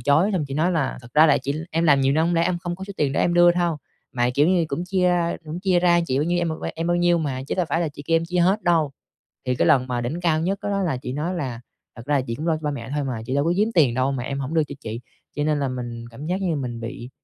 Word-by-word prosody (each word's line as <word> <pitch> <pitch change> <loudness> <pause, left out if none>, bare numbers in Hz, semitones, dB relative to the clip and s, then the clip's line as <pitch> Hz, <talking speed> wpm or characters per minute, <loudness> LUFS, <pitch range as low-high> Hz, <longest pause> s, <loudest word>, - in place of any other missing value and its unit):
chối, 155 +9 +3
xong 180 -6 0
chị 135 - -4
nói 170 +4 +1
là 150 -8 -1
"Thật 120 - -12
ra 155 +1 +7
là 145 - +4
chị 140 - -1 0.2
em 165 +1 0
làm 140 -4 +5
nhiều 135 0 +3
năm 160 +2 +2
hông 175 - +1
lẽ 165 - +3
em 180 -1 0
không 175 0 -4
có 190 - -7
số 200 - -8
tiền 140 -2 +1
để - - 0
em 175 - +2
đưa 175 0 +6
thâu. 175 -2 0 0.4
Mà 120 0 +1
kiểu 145 +5 +4
như 180 -3 +3
cũng 165 +5 -3
chia, 185 0 +1
a, 170 -1 +1
cũng 160 +3 -6
chia 185 -2 +2
ra 175 -1 +4
chị 130 +1 0
bao 150 - +1
nhiêu, 175 +1 0
em 170 -1 0 0.3
em 165 +1 -3
bao 175 - +2
nhiêu 175 -1 +3
mà, 135 -4 -3
chứ - - -2
đâu 180 -3 0
phải 165 +4 0
là 165 - 0
chị 145 0 -10
kêu 165 - +3
em 165 - 0
chia 180 +1 -2
hết 190 +4 +3
đâu." 165 -5 +2 0.6
Thì 125 - +1
cái - - +1
lần 135 -5 +4
mà 125 -1 -1
đỉnh 125 +9 -3
cao 165 -3 +2
nhất 190 +4 -1
đó - - -3
đó 200 - 0
là 165 -8 0
chị 125 0 -6
nói 155 +6 -2
là 130 -8 -4 0.4
"Thật 115 - -9
ra 150 - +1
là 135 - +2
chị 115 - -3
cũng 155 +6 -5
lo 165 - +3
cho - - -9
ba 150 - -1
mẹ 130 -4 -6
thôi 145 -1 -1
mà, 120 -4 -4
chị 130 - -2
đâu 140 +1 +2
có 170 - +2
giếm 210 +2 +2
tiền 140 -8 +4
đâu 130 +2 +1
mà 130 - -3
em 140 +2 -4
hổng 140 +4 -4
đưa 160 - +3
cho 145 - -8
chị." 110 +2 -6 0.4
Cho 145 - 0
nên 150 -1 +1
là 135 - 0
mình 120 -2 -5
cảm 135 +6 -9
giác 180 +3 -1
như 170 -5 0
mình 120 -4 -4
bị 120 +2 -7
155 Hz, 335 wpm, -23 LUFS, 135-175 Hz, 0.6 s, ra